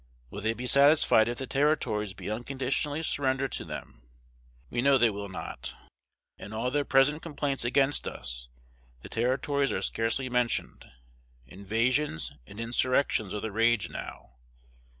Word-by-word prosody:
Will 100 - -6
they 110 +2 0
be 125 - -5
satisfied 140 -4 +5
if 120 0 -3
the 135 - -4
Territories 125 -8 0
be - - -8
unconditionally 135 +6 -2
surrendered 135 -3 0
to - - -3
them? - - -8 0.7
We 120 - 0
know 140 +1 +5
they 120 -3 +4
will 100 0 -6
not. 95 - -6 0.6
In 105 - -8
all 115 +3 -1
their 145 +1 +1
present 135 +4 +3
complaints 145 -5 -2
against 135 +3 +2
us, - - -5 0.5
the - - -9
Territories 135 +4 0
are - - -2
scarcely 115 +4 0
mentioned. 125 -1 -1 0.6
Invasions 110 - 0 0.2
and 100 - -11
insurrections 120 -2 +1
are 105 - -3
the 110 - -4
rage 115 0 +2
now. 65 - -9
125 Hz, 145 wpm, -28 LUFS, 110-140 Hz, 0.7 s, satisfied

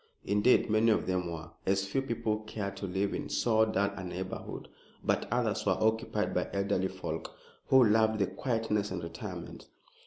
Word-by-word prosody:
Indeed, 105 +5 +4
many 110 +1 +3
of 110 - +2
them 90 -2 -1
were, 80 0 -7
as 95 0 +1
few 100 +8 0
people 115 -4 -1
cared 105 -2 -5
to 100 - -4
live 95 +2 -1
in - - -4
so 110 +9 +3
dull 100 -2 +1
a 95 - -6
neighborhood; 95 +1 -5 0.4
but - - 0
others - - +1
were - - +2
occupied 110 +1 +1
by - - 0
elderly 100 -1 +1
folk, - - -5 0.3
who 130 -1 +7
loved 110 0 +4
the 100 - +2
quietness 105 0 -1
and - - -4
retirement. 85 0 -7
100 Hz, 175 wpm, -31 LUFS, 95-110 Hz, 0.4 s, who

